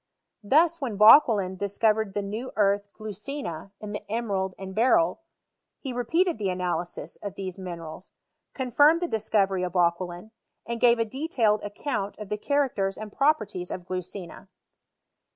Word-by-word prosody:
Thus, 315 +9 +3
when 235 -7 -3
Vauquelin 210 -4 +6
discovered 210 +1 0
the 205 - -1
new 220 +6 -5
earth 205 -1 +2
glticina, 210 - -6
in 210 -1 -7
the 210 0 -7
emerald 200 -5 -1
and 190 0 -7
beryl, 215 - +3 0.6
he 265 -3 -6
repeated 325 +6 +1
the 200 -2 0
analysis 180 -1 -3
of 200 -2 -7
these 190 -1 -6
minerals, 170 -1 -8 0.4
confirmed 290 +6 +4
the - - 0
discovery 205 - +1
of 180 -1 -3
Vauquelin, 175 +2 0 0.3
and 235 0 -4
gave 240 -1 +6
a 230 - +1
detailed 230 -4 0
ac 205 0 -7
count 205 -9 -2
of 210 -2 -8
the 210 - -2
characters 240 -7 0
and 215 -1 -8
properties 215 -11 0
of 180 - -5
glucina. 185 0 -7
210 Hz, 150 wpm, -26 LUFS, 190-240 Hz, 0.6 s, Vauquelin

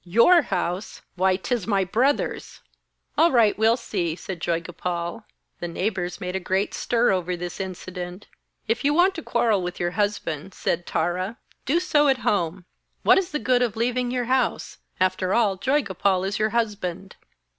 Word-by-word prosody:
'Your 235 - +5
house! 180 - -3
Why, 185 +1 +2
'tis 195 +3 -2
my 200 -3 +2
brother's!' 245 +10 0 0.6
'All 335 +2 +6
right, 225 -5 +4
we'll 225 +2 +3
see,' 175 -9 -2
said 185 0 -7
Joygopal. 170 +4 -3 0.3
The 175 - -3
neighbours 180 +1 -2
made 180 -2 -4
a - - 0
great 190 +2 -1
stir 235 0 +2
over 180 -1 -1
this 175 +2 -6
incident. 180 0 -6 0.4
'If 225 +4 0
you 290 +1 +2
want 365 +3 +4
to 330 - -6
quarrel 230 -7 +1
with 180 0 -5
your 175 0 0
husband,' 195 -4 -2
said 175 +1 -2
Tara, 180 +7 -1 0.3
'do 315 +6 +3
so 300 -5 +3
at 270 -1 +4
home. 175 -2 0 0.4
What - - +6
is 375 - -3
the 300 - -2
good 250 -4 +2
of 235 -4 0
leaving 245 +2 0
your 250 -1 -1
house? 255 0 0 0.2
After 185 0 +1
all, 215 -5 +3
Joygopal 195 - +1
is 195 - -2
your 215 0 +2
husband.' 195 -5 -2
195 Hz, 165 wpm, -24 LUFS, 180-240 Hz, 0.6 s, All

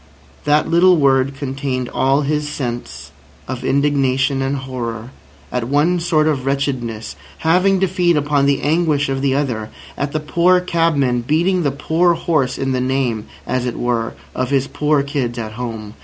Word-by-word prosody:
That 150 +1 +3
little 175 +2 +5
word 135 -1 +2
contained 135 -2 -3
all 135 +4 +1
his 150 +1 -1
sense 120 -5 -5 0.4
of - - -5
indignation 135 -1 +1
and 135 +1 -1
horror 125 -3 -5 0.4
at 125 -2 -1
one 150 +7 +2
sort 165 -3 +2
of 145 -5 0
wretchedness 125 - -2 0.2
having 185 +4 +3
to 190 - +3
feed 175 -2 +2
upon 145 -1 +2
the 140 -1 +1
anguish 150 -2 +1
of 135 0 -1
the 135 -1 +1
other—at 135 +1 -4
the 155 - -1
poor 175 +4 +3
cabman 160 -8 +1
beating 170 +8 +1
the 145 - +1
poor 165 +5 +1
horse 155 -6 0
in 135 0 -1
the 130 -1 0
name, 125 -4 -1 0.2
as 125 0 -1
it 120 - -4
were, 120 -2 -1 0.2
of 130 -1 -2
his 135 -1 +2
poor 150 0 +1
kids 135 -4 -2
at 110 -2 -4
home. 110 -2 -6
140 Hz, 165 wpm, -18 LUFS, 130-155 Hz, 0.4 s, little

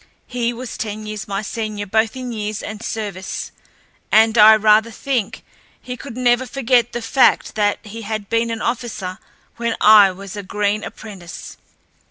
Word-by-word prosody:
He 240 -1 -2
was 240 +1 -7
ten 215 0 -5
years 215 -1 -6
my 200 +1 -3
senior 215 -1 -4
both 220 +3 +1
in 255 -1 -5
years 215 -2 -4
and 215 0 -7
service, 200 -4 -5 0.6
and 220 +1 +5
I 220 0 +9
rather 215 +1 +4
think 235 -1 -3 0.4
he 250 - -7
could 250 -1 -9
never 250 0 +2
forget 245 -2 +1
the 240 - -4
fact 260 +3 +3
that 205 -1 +1
he 220 +2 -8
had 215 -1 -4
been 230 +1 0
an 225 -1 -4
officer 230 -6 -3 0.4
when 235 -1 -1
I 210 -2 +8
was 195 +1 -9
a 205 - -4
green 205 +2 -1
apprentice. 185 -7 -9
220 Hz, 165 wpm, -20 LUFS, 205-235 Hz, 0.6 s, I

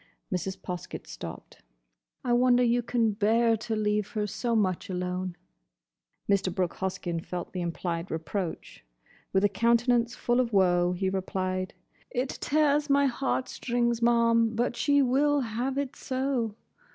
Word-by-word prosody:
Mrs. 190 +1 -2
Poskett 180 -1 -6
stopped. - - -9 0.6
"I 240 - +2
wonder 250 0 +4
you 240 0 +3
can 230 -2 +1
bear 225 +3 +3
to 220 +1 -3
leave 210 -1 0
her 210 -2 0
so 230 +4 -1
much 190 -5 0
alone." 180 0 -3 0.9
Mr. 195 -2 +2
Brooke 180 -1 -2
Hoskyn 180 -3 -2
felt 180 -1 -6
the 185 - -3
implied 170 0 -3
reproach. 160 +3 -4 0.5
With 190 +1 +2
a - - +6
countenance 235 +3 +2
full 240 +1 +1
of 240 -3 0
woe, 180 -2 +3
he 190 +2 -1
replied, 185 -1 -2 0.3
"It 255 +2 -1
tears 295 0 +1
my 280 0 +4
heart 260 0 0
strings, 235 -1 -1
ma'am; 230 -1 +3
but 240 +1 0
she 285 +3 +3
will 285 +3 +3
have 245 +3 -2
it 280 -2 -2
so. 255 -4 -2
225 Hz, 145 wpm, -28 LUFS, 185-245 Hz, 0.9 s, a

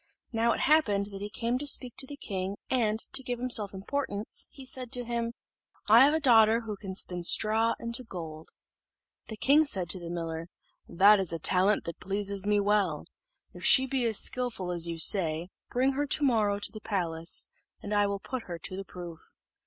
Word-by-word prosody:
Now, 230 0 +1
it - - -4
happened 210 -10 +2
that 195 0 -9
he 205 - -5
came 235 +4 -2
to 290 - -5
speak 250 -3 +1
to 265 - +1
the 285 - -9
king, 195 -4 -5
and, 225 -4 +1 0.2
to - - +4
give 245 -2 -4
himself 235 -5 +3
importance, 205 +1 -3
he 270 - -12
said 255 -1 -3
to 245 - 0
him, 235 0 -3 0.5
"I 225 +4 +7
have 290 +3 +3
a - - +1
daughter 230 -5 +5
who 220 -2 -6
can 195 -1 -8
spin 180 -2 +2
straw 220 +5 +2
into 235 +2 0
gold." 160 -7 -9 0.8
The 220 - -7
king 285 +7 +4
said 190 - -1
to 185 - 0
the 170 -1 -8
miller, 165 -1 -5 0.4
"That 200 +4 +5
is 190 -3 -1
a 165 - -2
talent 185 +5 +2
that 170 - -7
pleases 200 0 -1
me 210 0 +2
well; 200 -6 0 0.5
if - - -12
she 265 - +6
be 265 -1 -2
as 225 -3 +1
skilful 240 -8 -3
as 170 -1 0
you 170 -1 -5
say, 165 -1 +3 0.2
bring 260 +2 +1
her 290 +2 -2
to 290 - +3
morrow 215 -6 +2
to 205 - -2
the 215 - -10
palace, 165 -5 -1 0.4
and 205 - -5
I 205 0 +2
will 200 0 -3
put 255 +3 -6
her 175 -2 -6
to 175 +3 -6
the 195 - -6
proof." 175 -3 -10
210 Hz, 205 wpm, -28 LUFS, 185-245 Hz, 0.8 s, I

